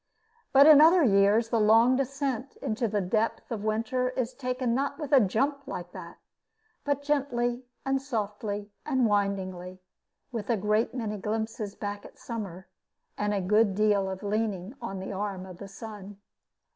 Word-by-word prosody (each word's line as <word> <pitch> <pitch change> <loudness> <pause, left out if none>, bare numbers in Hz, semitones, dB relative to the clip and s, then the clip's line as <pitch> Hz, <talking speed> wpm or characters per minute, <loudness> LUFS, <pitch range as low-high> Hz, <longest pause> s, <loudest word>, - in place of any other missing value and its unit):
But 275 +1 +7
in 300 -1 +9
other 335 +2 +7
years 205 0 +4
the 230 - +1
long 225 +4 +5
descent 275 -1 -2
into 235 -2 -2
the 205 -1 0
depth 215 +7 -1
of 215 -3 -3
winter 230 +4 0
is 255 -1 -3
taken 255 -2 -2
not 280 +2 -1
with 300 -3 -6
a 280 - +7
jump 275 +7 +1
like 175 -7 -6
that, - - -10 0.7
but 285 -1 -1
gently 255 -4 0 0.2
and 270 0 +1
softly 210 -5 -4
and 265 -4 +1
windingly, 190 -3 -1 0.5
with 225 -4 -5
a 230 - +2
great 210 +5 0
many 215 -4 -3
glimpses 215 0 -3
back 205 -1 -5
at - - -12
the - - -27
summer, 195 -6 -6 0.5
and 210 0 -1
a 200 -1 0
good 205 +1 +3
deal 205 -2 +2
of 190 +2 -6
leaning 205 -1 -2
on 195 -5 -5
the 190 - -6
arm 195 -1 -4
of 185 -1 -11
the 200 - -8
sun. 205 -1 -9
220 Hz, 170 wpm, -28 LUFS, 200-255 Hz, 0.7 s, in